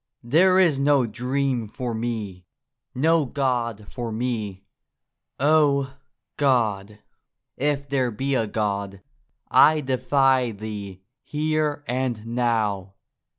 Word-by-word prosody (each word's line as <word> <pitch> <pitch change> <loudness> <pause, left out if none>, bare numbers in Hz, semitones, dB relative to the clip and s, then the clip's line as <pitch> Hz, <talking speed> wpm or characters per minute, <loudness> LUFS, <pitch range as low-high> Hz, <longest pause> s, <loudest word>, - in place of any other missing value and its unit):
There 175 +10 +4
is 170 -7 +4
no 140 -2 +3
dream 125 +1 -1
for 120 +2 -5
me, 110 -6 -4 0.5
no 160 +4 +3
God 120 -6 -1
for 120 -2 -5
me! 110 -4 -3 0.7
Oh, 140 -2 +3 0.4
God, 110 -7 +1 0.6
if 140 0 -1
there 130 -3 0
be 135 +5 -2
a 115 -4 +1
God, 100 -2 -3 0.5
I 150 +4 +6
defy 130 -2 +2
Thee 100 -3 -7 0.2
here 150 -1 -1
and 125 -3 -2
now. 110 -5 -1
125 Hz, 105 wpm, -24 LUFS, 110-140 Hz, 0.7 s, I